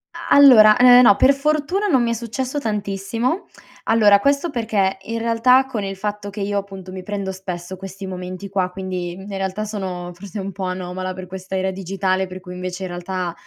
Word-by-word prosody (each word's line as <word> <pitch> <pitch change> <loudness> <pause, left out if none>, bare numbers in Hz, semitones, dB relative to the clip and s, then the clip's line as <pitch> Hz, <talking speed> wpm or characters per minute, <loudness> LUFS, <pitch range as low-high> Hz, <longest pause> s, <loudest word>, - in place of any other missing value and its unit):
A - - -8
allora, 225 -7 +8
eh, 250 0 +8
no 220 -5 +7
per 265 +7 +5
fortuna 305 +8 0
non 265 -9 +3
mi 235 - 0
è - - +1
successo 245 +4 -3
tantissimo; 215 - -2 0.4
allora 210 -3 +5
questo 280 +7 +1
perché 215 -7 0
in 230 +3 -4
realtà 235 +3 +3
con 225 -6 -4
il 195 0 -4
fatto 205 +1 -4
che 210 - -8
io, 200 +1 -1
appunto, 195 -2 -6
mi 185 0 -7
prendo 200 -1 -4
spesso 185 -1 -7
questi 195 +1 -8
momenti 185 +1 -7
qua, 190 -2 0
quindi 185 -2 -4
in 190 +2 -11
realtà 195 +1 -3
sono 185 -4 -5
forse 195 +3 -8
un 195 0 -4
po' 195 0 -7
anomala 185 0 -4
per 185 0 -9
questa 190 +1 -7
era 190 0 0
digitale, 190 0 -1
per 185 0 -8
cui 180 -1 -10
invece 180 +1 -5
in 185 - -4
realtà 175 0 -4
195 Hz, 200 wpm, -20 LUFS, 185-230 Hz, 0.4 s, allora